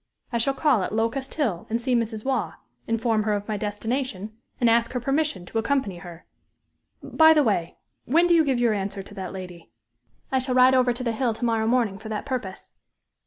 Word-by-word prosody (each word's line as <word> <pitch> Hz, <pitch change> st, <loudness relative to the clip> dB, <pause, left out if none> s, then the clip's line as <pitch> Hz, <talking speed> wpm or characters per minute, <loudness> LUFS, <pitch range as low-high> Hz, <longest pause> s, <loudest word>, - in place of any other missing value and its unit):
I 235 Hz, -, +1 dB
shall 270 Hz, +4 st, +1 dB
call 270 Hz, -6 st, +2 dB
at 190 Hz, -, -3 dB
Locust 230 Hz, +5 st, -2 dB
Hill 230 Hz, -, -1 dB
and 230 Hz, +1 st, 0 dB
see 255 Hz, +1 st, -1 dB
Mrs. 230 Hz, -2 st, -1 dB
Waugh, 245 Hz, -10 st, -1 dB, 0.3 s
inform 225 Hz, -1 st, +1 dB
her 210 Hz, 0 st, 0 dB
of 205 Hz, 0 st, -3 dB
my 215 Hz, -, -2 dB
destination, 215 Hz, 0 st, -3 dB, 0.2 s
and 240 Hz, -, +3 dB
ask 230 Hz, +1 st, +2 dB
her 250 Hz, -, -1 dB
permission 275 Hz, -, -1 dB
to 225 Hz, -, -2 dB
accompany 225 Hz, -7 st, -1 dB
her. 175 Hz, -2 st, -11 dB, 0.8 s
By 320 Hz, 0 st, +5 dB
the 300 Hz, -, +4 dB
way 195 Hz, -8 st, -1 dB, 0.3 s
when 330 Hz, +7 st, +3 dB
do 350 Hz, -, +4 dB
you 330 Hz, -1 st, +5 dB
give 265 Hz, -4 st, 0 dB
your 235 Hz, -2 st, +3 dB
answer 195 Hz, -1 st, -3 dB
to 200 Hz, -, -13 dB
that 190 Hz, -3 st, -6 dB
lady?" 180 Hz, -6 st, -9 dB, 0.6 s
"I 265 Hz, -, +2 dB
shall 255 Hz, 0 st, -2 dB
ride 255 Hz, +1 st, +6 dB
over 255 Hz, -1 st, +3 dB
to 245 Hz, +1 st, -4 dB
the 235 Hz, -, 0 dB
Hill 230 Hz, -1 st, -1 dB
to 240 Hz, -, -3 dB
morrow 225 Hz, -1 st, +1 dB
morning 230 Hz, -5 st, +1 dB
for 220 Hz, 0 st, -9 dB
that 215 Hz, -1 st, -4 dB
purpose." 225 Hz, -8 st, -5 dB
230 Hz, 215 wpm, -24 LUFS, 205-260 Hz, 0.8 s, ride